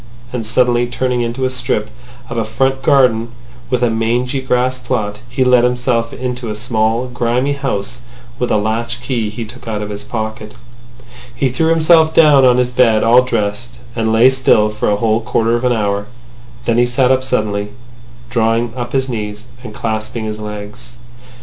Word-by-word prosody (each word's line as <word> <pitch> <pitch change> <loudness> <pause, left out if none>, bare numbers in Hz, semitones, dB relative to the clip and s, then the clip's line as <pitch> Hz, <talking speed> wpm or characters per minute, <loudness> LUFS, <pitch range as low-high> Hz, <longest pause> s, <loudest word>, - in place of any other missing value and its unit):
And 115 -3 -3
suddenly 120 +1 +2
turning 125 0 -1
into 120 +3 -2
a 130 - 0
strip 105 -4 -2 0.4
of 120 - -6
a 115 - 0
front 135 +5 0
garden 125 -4 +3 0.4
with 125 -1 0
a 120 - +2
mangy 120 +4 0
grass 130 0 0
plot, 110 -5 -3
he 130 +2 0
let 125 -1 +4
himself 125 -2 0
into 125 -2 -4
a 105 - -3
small 110 +1 0
grimy 125 +2 -1
house 125 -4 -3 0.4
with 125 - -1
a - - +2
latch 115 +3 -2
key 120 -4 -1
he 115 +2 -6
took 120 +2 -13
out 105 -2 -3
of 105 - -6
his 100 0 -5
pocket. 110 -1 -5 0.8
He 130 +2 +1
threw 160 +6 0
himself 160 0 +4
down 150 -4 +6
on 125 -1 +5
his 125 0 +1
bed 120 -3 +3
all 120 +2 +6
dressed, 120 0 -3 0.2
and 110 -1 0
lay 115 +4 +5
still 120 -5 +3
for 105 - -1
a 105 - +2
whole 110 +1 +1
quarter 115 +1 +1
of 120 - -2
an 125 - +2
hour. 105 -3 -1 0.6
Then 115 0 +2
he 120 - +4
sat 125 +1 +2
up 130 0 +2
suddenly, 105 -5 -1 0.6
drawing 115 0 +1
up 120 -1 -5
his 135 -1 +1
knees, 105 -3 -5 0.2
and 115 - -8
clasping 110 +1 -4
his 110 0 -5
legs. 105 +3 -8
120 Hz, 180 wpm, -16 LUFS, 110-125 Hz, 0.8 s, down